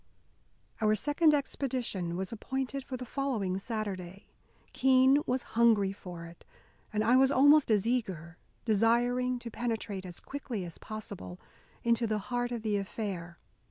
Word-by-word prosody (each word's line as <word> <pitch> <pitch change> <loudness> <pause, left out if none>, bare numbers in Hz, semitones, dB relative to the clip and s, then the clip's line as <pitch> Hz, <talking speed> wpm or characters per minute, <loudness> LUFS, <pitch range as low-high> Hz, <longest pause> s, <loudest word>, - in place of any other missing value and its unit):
Our 215 0 +4
second 295 - +3
expedition 240 -11 -2
was 190 0 -3
appointed 265 +4 -3
for 260 -1 -5
the 250 - -6
following 225 -8 -1
Saturday. 195 -4 -5 0.5
Keene 265 +2 +5
was 255 0 0
hungry 225 -4 +4
for 175 -4 -9
it, 170 0 -13 0.5
and 215 0 0
I 235 +3 +4
was 265 +1 +5
almost 285 +1 +6
as 215 -1 +3
eager, 185 -9 -2 0.3
desiring 245 +3 +2
to 240 -1 -8
penetrate 215 -5 -3
as 175 - -8
quickly 245 -9 -5
as 170 - -9
possible 200 -4 -7 0.4
into 235 0 +2
the 215 0 0
heart 245 +4 -2
of 235 -2 -4
the 210 -2 +1
affair. 190 -4 -5
225 Hz, 145 wpm, -31 LUFS, 195-255 Hz, 0.5 s, almost